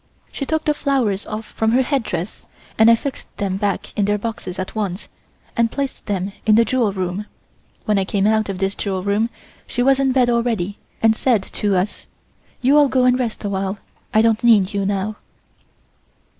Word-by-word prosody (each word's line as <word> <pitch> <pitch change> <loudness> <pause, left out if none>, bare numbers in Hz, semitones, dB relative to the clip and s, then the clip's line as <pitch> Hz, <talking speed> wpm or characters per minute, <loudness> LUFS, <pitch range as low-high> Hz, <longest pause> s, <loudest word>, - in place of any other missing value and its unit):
She 275 - -5
took 315 0 -1
the 300 - +3
flowers 255 -9 0
off 215 +1 -5
from 220 +1 -1
her 260 +2 +4
headdress 230 - -3 0.3
and 220 +1 +6
I 230 - +8
fixed 270 +4 -7
them 190 -2 -1
back 200 -1 -2
in 205 - +1
their 205 +1 +1
boxes 205 -4 -5
at 185 -1 -4
once, 200 -3 -3 0.5
and 230 0 +2
placed 275 +2 -4
them 195 -1 -2
in 215 - +4
the 230 +1 +5
jewel 235 -2 +1
room. 190 +2 -3 0.6
When 210 -2 +2
I 190 - 0
came 195 0 0
out 215 -1 +2
of 195 - -3
this 195 +1 0
jewel 190 -3 -3
room 205 +3 +1 0.4
she 245 - -1
was 270 +1 +4
in 270 -1 +2
bed 255 -1 +3
already, 230 -5 0 0.2
and 225 0 +5
said 225 -4 +2
to 205 0 -1
us: 185 +3 -2 0.6
"You 280 +4 +5
all 290 - +5
go 255 -1 +2
and 250 0 +4
rest 230 -3 -3
a - - 0
while. 195 0 -2 0.3
I 220 - +4
don't 225 0 +2
need 210 -5 +5
you 200 -1 0
now." 205 +1 -2
215 Hz, 200 wpm, -20 LUFS, 195-240 Hz, 0.6 s, I